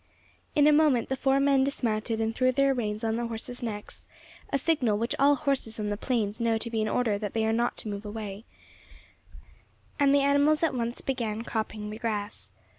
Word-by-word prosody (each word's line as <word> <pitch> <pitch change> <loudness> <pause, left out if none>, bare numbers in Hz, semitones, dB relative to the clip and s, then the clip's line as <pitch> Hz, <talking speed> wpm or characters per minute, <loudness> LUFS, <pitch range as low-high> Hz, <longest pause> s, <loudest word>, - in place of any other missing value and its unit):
In 290 - +5
a 300 - +7
moment 295 -6 +3
the 265 - 0
four 270 +1 +2
men 275 -1 +4
dismounted 225 -4 -1
and 225 0 0
threw 255 +2 +2
their 275 +1 +3
reins 215 -3 -3
on 225 0 0
the 235 0 -2
horses' 230 +2 -6
necks 210 -3 -6 0.4
a 275 - +2
signal 270 -8 +1
which 230 +3 -1
all 285 +1 +5
horses 260 -6 -1
on 210 -1 -2
the 205 - -1
plains 220 -1 -1
know 230 -1 +2
to 230 +1 -5
be 225 -1 0
an 215 - 0
order 220 -3 0
that 205 -2 -4
they 225 -1 +1
are 220 - +1
not 235 +1 0
to - - -6
move 205 0 -4
away 210 -1 -6 1.6
and 280 -1 +5
the 280 0 +4
animals 285 +3 +3
at 325 - +2
once 235 -1 -2
began 230 -5 -2
cropping 215 -2 -4
the 215 - -7
grass. 215 -3 -3
230 Hz, 205 wpm, -28 LUFS, 215-270 Hz, 1.6 s, a